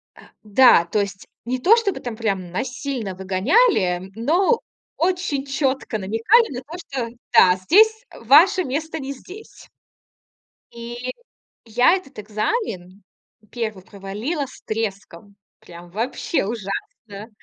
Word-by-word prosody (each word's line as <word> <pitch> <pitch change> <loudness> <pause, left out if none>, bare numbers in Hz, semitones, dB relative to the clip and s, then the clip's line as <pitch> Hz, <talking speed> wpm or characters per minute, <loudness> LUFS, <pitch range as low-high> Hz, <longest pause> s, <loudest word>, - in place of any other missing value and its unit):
А, - - -16 0.2
да, 210 -4 +6
то 190 +5 -1
есть 200 -1 -4 0.2
не 255 +1 -2
то 395 - +6
чтобы 405 -5 -1
там 240 -3 -6
прям 195 -6 -2
насильно 250 -2 -4
выгоняли, 190 - +1
но 350 - +2 0.4
очень 345 -5 -1
четко 270 -4 -1
намекали 235 - +2
на - - -5
то, 320 +7 -9
что 265 -8 -5 0.3
да, 180 0 +7
здесь, 440 - +4
э, - - -14
ваше 345 - +6
место 320 +3 -3
не 275 0 -5
здесь. 380 +10 -13 1.0
Или 240 +2 -6 0.5
я 245 +9 +4
этот 275 - -8
экзамен, 210 - -3 0.5
1, 215 -5 -4
провалила 210 - -4
с 255 - -15
треском. 200 -3 -5 0.2
Прям 175 0 -13
вообще 230 - -2
ужасно! 210 - -6
240 Hz, 125 wpm, -21 LUFS, 200-315 Hz, 1.0 s, да